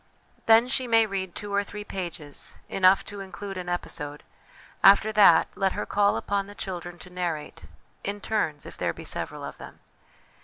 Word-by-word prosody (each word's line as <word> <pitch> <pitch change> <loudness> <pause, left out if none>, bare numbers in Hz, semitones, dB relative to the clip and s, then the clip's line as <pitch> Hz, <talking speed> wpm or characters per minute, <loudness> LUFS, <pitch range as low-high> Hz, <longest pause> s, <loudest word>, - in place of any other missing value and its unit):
Then, 225 +2 +7
she 260 0 0
may 225 -1 +5
read 190 -3 -4
two 205 -1 -6
or 200 0 +2
three 210 +1 -8
pages, 170 -7 -6
enough 190 0 +4
to 205 - -8
include 195 +1 -7
an 180 -1 -5
episode; 150 -4 -4 0.6
after 200 +2 +7
that, 200 -7 +6
let 195 -1 +1
her - - -3
call 200 0 +2
upon 200 -1 -1
the 205 - -11
children 175 -3 -6
to 180 - -12
narrate, 170 -4 -4 0.4
in 205 +1 -3
turns, 195 -9 -1
if - - -10
there - - 0
be - - -10
several - - -2
of - - -7
them. - - -11
195 Hz, 180 wpm, -26 LUFS, 175-205 Hz, 0.6 s, Then